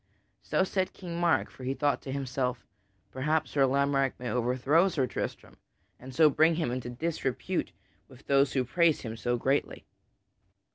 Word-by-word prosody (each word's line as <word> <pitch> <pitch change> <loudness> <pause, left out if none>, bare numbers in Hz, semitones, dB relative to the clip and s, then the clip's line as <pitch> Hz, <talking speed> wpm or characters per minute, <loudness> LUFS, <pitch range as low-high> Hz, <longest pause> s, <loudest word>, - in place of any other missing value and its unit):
So - - +1
said 190 0 -1
King 175 -2 -6
Mark, 175 -1 +2
for 130 - -12
he 130 +2 -2
thought 145 -1 0
to 135 - -7
himself: 125 -3 -2 0.5
"Perhaps 155 +4 -1
Sir 135 -2 +3
Lamorack 140 0 +1
may 125 -1 -4
overthrow 130 +8 +2
Sir 145 -8 0
Tristram, - - -6 0.4
and 130 +1 -10
so 160 -1 +6
bring 160 +3 +3
him 160 -7 -1
into 125 -1 -4
disrepute 135 -1 -2 0.4
with 130 0 -17
those 140 -1 +3
who 130 - +1
praise 165 +5 +2
him 115 -2 -6
so 120 +2 -1
greatly." 135 +4 -1
135 Hz, 160 wpm, -29 LUFS, 125-160 Hz, 0.5 s, so